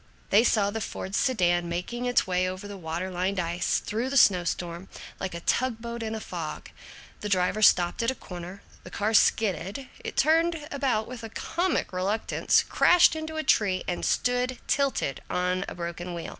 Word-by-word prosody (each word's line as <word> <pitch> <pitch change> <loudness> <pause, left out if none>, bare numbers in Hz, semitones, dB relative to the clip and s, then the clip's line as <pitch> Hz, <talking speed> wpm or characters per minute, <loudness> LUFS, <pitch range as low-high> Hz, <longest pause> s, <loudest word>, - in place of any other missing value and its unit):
They 210 +3 +6
saw 205 -4 +2
the 225 +1 -4
Ford 190 -1 -5
sedan 175 -8 +1
making 235 +9 -3
its 245 - +3
way 185 0 0
over 185 +2 -7
the 205 - -7
water 175 +1 -4
lined 185 +2 -1
ice, 175 0 0
through 230 +5 -3
the 275 - 0
snow 185 -7 +6
storm, 175 +2 -4 0.3
like 190 -3 -4
a 170 - -6
tug 250 +4 0
boat 235 0 -6
in 220 0 -3
a - - -4
fog. - - -6 0.5
The 210 - -4
driver 185 +2 +1
stopped 175 -3 +4
at 230 - +1
a 260 - -2
corner. 180 0 -9 0.2
The - - -10
car 210 +2 -1
skidded, 215 +4 +1
it - - -6
turned 320 +1 +2
about 260 -6 0
with 245 -2 -8
comic 345 - -1
reluctance, 195 +4 +1
crashed 355 -2 +5
into 315 0 -5
a 315 - -2
tree, 190 -9 +2
and 175 - -3
stood 250 +1 0
tilted 275 - 0
on 180 +1 0
a - - -7
broken 175 +1 -5
wheel. 170 - -5
205 Hz, 185 wpm, -27 LUFS, 180-245 Hz, 0.5 s, They